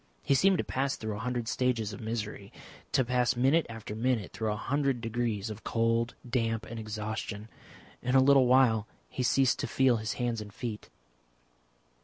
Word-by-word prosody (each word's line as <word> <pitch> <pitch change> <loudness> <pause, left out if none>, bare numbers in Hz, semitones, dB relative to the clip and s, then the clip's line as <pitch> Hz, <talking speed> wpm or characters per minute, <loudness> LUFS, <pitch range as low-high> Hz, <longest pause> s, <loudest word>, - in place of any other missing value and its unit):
He - - +2
seemed 190 +8 +4
to - - 0
pass 135 +1 -1
through 110 -2 -4
a - - -6
hundred 120 0 -2
stages 115 -4 0
of - - -8
misery, 105 -3 -4 0.4
to 130 - +2
pass 125 0 +1
minute 135 +6 +3
after 115 -2 -7
minute 115 -3 -1
through 110 -1 -1
a - - -1
hundred 135 +3 0
degrees 115 -2 -2
of 110 0 -9
cold, 115 +1 0
damp, 115 -2 -1
and 115 +1 -7
exhaustion. 110 0 -5 0.5
In 125 +1 0
a - - +8
little 135 -2 +6
while 120 -4 +4 0.2
he - - -4
ceased 130 +1 +3
to - - -2
feel 130 -3 +3
his 110 -1 -3
hands 120 -1 -2
and 105 -1 -9
feet. 110 +1 -6
115 Hz, 180 wpm, -30 LUFS, 110-125 Hz, 0.5 s, a